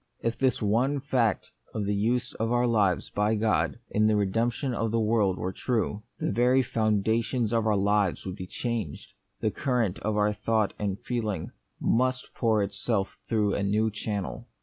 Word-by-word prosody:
If 115 0 0
this 130 -3 +1
one 125 +7 +2
fact 125 -5 0 0.2
of 105 - -1
the 100 - 0
use 120 +5 0
of 115 +1 -2
our 120 0 +3
lives 105 -7 +1
by 105 +2 +1
God 85 -9 +1
in 110 +1 +3
the 110 - +3
redemption 115 +6 0
of 115 -1 -1
the 115 +1 +1
world 105 -4 +2
were 95 +1 -3
true, 110 -3 -1 0.2
the - - 0
very 125 +4 +3
foundations 110 +1 +1
of 115 -1 +2
our 105 -2 +3
life 100 -1 +1
would 95 -1 -4
be 90 -2 -7
changed, 115 - -4 0.3
the 110 - +1
current 120 -8 0
of 105 0 -1
our 105 0 +3
thought 110 0 0
and 100 -1 -2
feeling 110 -5 -3 0.3
must 125 +1 0
pour 110 -3 +2
itself 100 0 -2
through 105 -3 +2
a - - -1
new 105 +3 +1
channel. 105 +2 -4
110 Hz, 175 wpm, -27 LUFS, 100-115 Hz, 0.3 s, our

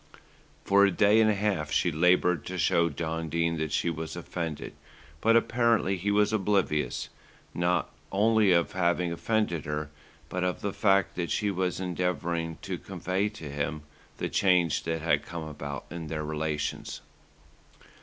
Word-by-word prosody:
For 100 0 +5
a 100 - +6
day 105 +4 +4
and 110 - +4
a 105 - +2
half 95 -7 -1
she 85 - +2
laboured 90 0 +3
to 95 - -4
show 85 -1 +3
John 80 +1 -3
Dene 85 +1 0
that 80 -1 -2
she 85 - +1
was 80 0 -5
offended; 80 -4 -5 0.5
but 115 +1 +4
apparently 115 -4 +2
he 95 +3 -2
was 105 +1 +3
oblivious, 95 -7 0 0.4
not 90 +1 0 0.2
only 105 0 +4
of 85 -2 +3
having 90 -1 +1
offended 85 -4 -1
her, 75 0 -3 0.4
but 90 0 -3
of 90 -1 -1
the 100 -1 -2
fact 100 -3 +2
that 85 -2 -2
she 105 -1 0
was 90 -1 -1
endeavouring 85 -2 -2
to 95 -3 -4
convey 95 +2 -2
to 105 -8 -9
him 75 +1 -3 0.3
the - - -2
change 90 -5 +2
that 80 -1 -2
had 75 -3 +2
come 85 +1 -6
about 70 -2 -6
in 85 -2 -6
their 75 0 -3
relations. 75 -1 -3
85 Hz, 160 wpm, -28 LUFS, 80-100 Hz, 0.5 s, a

